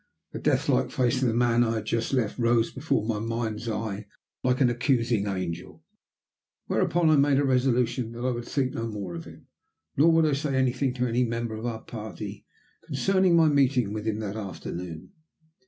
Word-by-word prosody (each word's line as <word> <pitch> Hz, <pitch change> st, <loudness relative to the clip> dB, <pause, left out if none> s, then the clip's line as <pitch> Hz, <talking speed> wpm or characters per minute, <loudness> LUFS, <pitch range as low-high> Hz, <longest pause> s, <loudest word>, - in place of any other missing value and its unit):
The -, -, -6 dB
death -, -, +1 dB
like 60 Hz, -, +2 dB
face 125 Hz, 0 st, +1 dB
of 130 Hz, -, +3 dB
the 115 Hz, -, +1 dB
man 120 Hz, 0 st, +3 dB
I 115 Hz, -1 st, 0 dB
had 110 Hz, -1 st, -3 dB
just 115 Hz, +1 st, -1 dB
left 125 Hz, -4 st, 0 dB
rose 115 Hz, -1 st, +2 dB
before 130 Hz, -6 st, -1 dB
my 110 Hz, -2 st, -1 dB
mind's 115 Hz, 0 st, -3 dB
eye 105 Hz, -2 st, -4 dB, 0.4 s
like 125 Hz, 0 st, +2 dB
an 125 Hz, -3 st, +4 dB
accusing 120 Hz, -4 st, +1 dB
angel, 90 Hz, -3 st, -4 dB, 0.8 s
whereupon 165 Hz, 0 st, +2 dB
I 155 Hz, -, +5 dB
made 140 Hz, 0 st, +4 dB
a 145 Hz, -, +3 dB
resolution 125 Hz, -2 st, +1 dB
that 120 Hz, +1 st, -5 dB
I 130 Hz, -, +2 dB
would 120 Hz, -1 st, -4 dB
think 130 Hz, -3 st, -1 dB
no 115 Hz, -, -3 dB
more 100 Hz, -5 st, -5 dB
of 85 Hz, -1 st, -7 dB
him -, -, -13 dB, 0.5 s
nor 160 Hz, +4 st, +5 dB
would 165 Hz, 0 st, +4 dB
I 150 Hz, -, +2 dB
say 140 Hz, 0 st, -1 dB
anything 130 Hz, 0 st, +1 dB
to 125 Hz, -1 st, 0 dB
any 120 Hz, +1 st, +1 dB
member 115 Hz, -1 st, -2 dB
of 110 Hz, +2 st, -4 dB
our 110 Hz, -2 st, -4 dB
party 110 Hz, -6 st, -7 dB, 0.4 s
concerning 190 Hz, -2 st, +2 dB
my 165 Hz, -1 st, +6 dB
meeting 130 Hz, -7 st, +2 dB
with 110 Hz, 0 st, -4 dB
him 110 Hz, -1 st, 0 dB
that 105 Hz, -1 st, -4 dB
afternoon. 90 Hz, -, -6 dB
120 Hz, 195 wpm, -27 LUFS, 110-130 Hz, 0.8 s, my